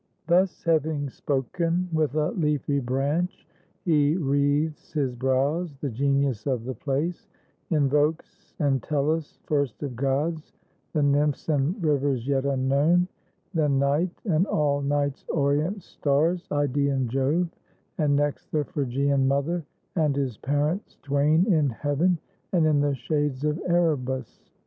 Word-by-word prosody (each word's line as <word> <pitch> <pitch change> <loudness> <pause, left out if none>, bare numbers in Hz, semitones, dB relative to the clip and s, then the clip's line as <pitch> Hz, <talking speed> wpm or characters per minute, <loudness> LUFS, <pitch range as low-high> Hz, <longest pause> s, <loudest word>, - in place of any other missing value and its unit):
Thus 180 +2 +2
having 155 -3 +1
spoken, 165 +8 -1
with 155 -3 +1
a 155 -1 +1
leafy 150 - 0
branch 140 +8 -1 0.4
He 150 -1 +3
wreathes 145 0 0
his 140 -5 0
brows, 135 +5 0
the 140 -2 -3
Genius 140 -2 0
of 125 -4 -1
the 130 - -3
place 150 - -2 0.4
Invokes, 150 +1 0
and 140 -4 +1
Tellus, 150 +1 -1
first 140 -4 -1
of 135 -4 -4
gods, 145 +5 -1 0.2
— - - -43
the 155 -3 +2
Nymphs 145 +1 +1
And 150 +3 +1
Rivers 140 -5 +1
yet 135 -1 +1
unknown; 140 +7 +2 0.4
then 150 -5 +2
Night, 140 +6 +2 0.2
and 180 0 +2
all 145 -1 +1
Night's 140 0 -1
orient 155 +6 0
stars, 160 +5 0
Id^ean 140 -2 +1
Jove, 135 +8 +1 0.5
and 145 -2 +3
next 145 0 -1
The 150 -1 +1
Phrygian 140 -2 0
Mother, 145 +5 0 0.3
and 155 -5 +2
his 135 -5 -1
parents 150 +8 -1
twain 145 +4 +3
In 150 -4 +3
heaven, 145 +8 +1 0.4
and 170 -3 +4
in 150 -2 +3
the 145 -1 +1
shades 145 +1 -1
of 150 +2 0
Erebus. 150 -7 0
145 Hz, 135 wpm, -26 LUFS, 140-160 Hz, 0.5 s, and